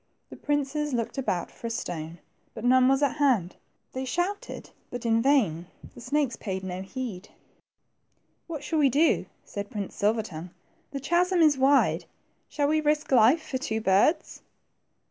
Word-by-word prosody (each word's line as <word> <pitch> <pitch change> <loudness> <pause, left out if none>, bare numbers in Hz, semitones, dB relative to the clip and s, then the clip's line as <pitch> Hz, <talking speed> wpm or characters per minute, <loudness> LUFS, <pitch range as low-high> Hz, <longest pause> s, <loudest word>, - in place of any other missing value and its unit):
The - - -8
princes 290 0 -1
looked 235 +3 -2
about 185 -9 -2
for 235 - -7
a - - -3
stone, 170 -7 -5 0.4
but 225 0 -6
none 255 +1 +5
were 270 - +5
at 285 - -3
hand. 245 - +2 0.4
They 260 - -3
shouted, 350 +9 -3 0.2
but 245 -1 -6
in 230 0 +3
vain; 210 - +2 0.3
the - - -12
snakes 270 0 0
paid 190 -3 -5
no 185 0 -4
heed. 205 -2 -6 1.2
What 310 -4 -6
shall 315 +1 -1
we 285 -2 +5
do? 300 +6 +2
" - - -40
said 200 0 -6
Prince 205 -3 -5
Silver 215 +2 +1
tongue; 170 -3 -8 0.4
the 280 - -5
chasm 350 +6 +1
is 305 -2 +5
wide; 270 +1 +3 0.4
shall 290 -1 0
we 310 +1 +2
risk 300 0 0
life 255 +6 +5
for 260 - -2
two 220 -5 -2
birds 205 - +2
255 Hz, 165 wpm, -27 LUFS, 210-290 Hz, 1.2 s, none